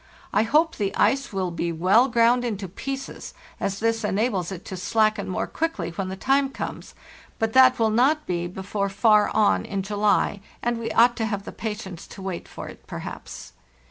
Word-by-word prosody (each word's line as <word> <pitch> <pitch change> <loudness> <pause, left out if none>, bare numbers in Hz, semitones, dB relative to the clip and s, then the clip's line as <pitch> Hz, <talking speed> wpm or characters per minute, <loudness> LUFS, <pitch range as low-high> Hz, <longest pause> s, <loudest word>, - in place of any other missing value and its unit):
I 210 - +4
hope 305 +9 +2
the 200 -2 -1
ice 275 0 +2
will 190 -3 -2
be 170 0 -2
well 185 +10 +4
ground 240 0 +3
into 210 -5 -3
pieces, 270 +9 -6 0.2
as 195 0 -2
this 230 0 0
enables 205 -3 0
it 185 -2 -7
to 190 - -6
slacken 215 +4 +1
more 185 - -1
quickly 205 - -3
when 185 +2 -4
the 190 - -4
time 270 +6 +2
comes; - - -7 0.4
but 225 0 -1
that 260 -1 +7
will 225 -1 +2
not 275 +7 +3
be 175 -1 -2
before 200 +2 -3
far 210 +1 +4
on 210 - +2
in 195 -1 -3
July, 205 0 +1 0.2
and 240 -1 0
we 230 - -3
ought 240 +1 +5
to 225 - 0
have 205 -2 -3
the - - -7
patience 210 -6 -6
to 195 - -11
wait 190 -3 -5
for - - -8
it - - -13
perhaps. - - -8
215 Hz, 190 wpm, -24 LUFS, 190-240 Hz, 0.4 s, that